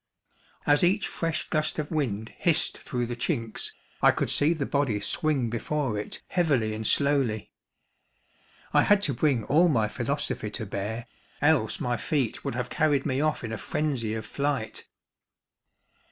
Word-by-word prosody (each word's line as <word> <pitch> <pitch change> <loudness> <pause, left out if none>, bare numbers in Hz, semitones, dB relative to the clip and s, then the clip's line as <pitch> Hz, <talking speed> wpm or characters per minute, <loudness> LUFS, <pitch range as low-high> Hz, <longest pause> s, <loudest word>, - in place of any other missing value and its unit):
As 145 +2 +4
each 190 +4 +3
fresh 165 -1 -2
gust 155 0 0
of 150 -2 -3
wind 115 -8 -2
hissed 160 -2 +2
through 125 -1 -2
the 120 +1 -4
chinks, 120 -3 -2 0.3
I - - +7
could - - +1
see 145 +3 +3
the 150 -4 -2
body 135 -8 0
swing 135 - 0
before 130 +1 -1
it, 105 - -7
heavily 140 -12 +1
and 110 0 -2
slowly. 135 -7 +2 1.2
I - - +6
had 205 -1 +4
to 145 - +1
bring 125 -2 +1
all 165 +9 +4
my 115 -9 +2
philosophy 120 -1 -2
to 110 +1 -5
bear, 105 +4 -4 0.3
else 145 -7 +2
my 120 -1 -1
feet 130 0 -1
would - - -3
have 125 0 -3
carried 145 -3 +2
me 130 +1 0
off 155 -3 0
in 115 - -4
a 115 - -4
frenzy 125 -8 -1
of 110 - -5
flight. 140 -6 -2
135 Hz, 160 wpm, -27 LUFS, 115-150 Hz, 1.2 s, I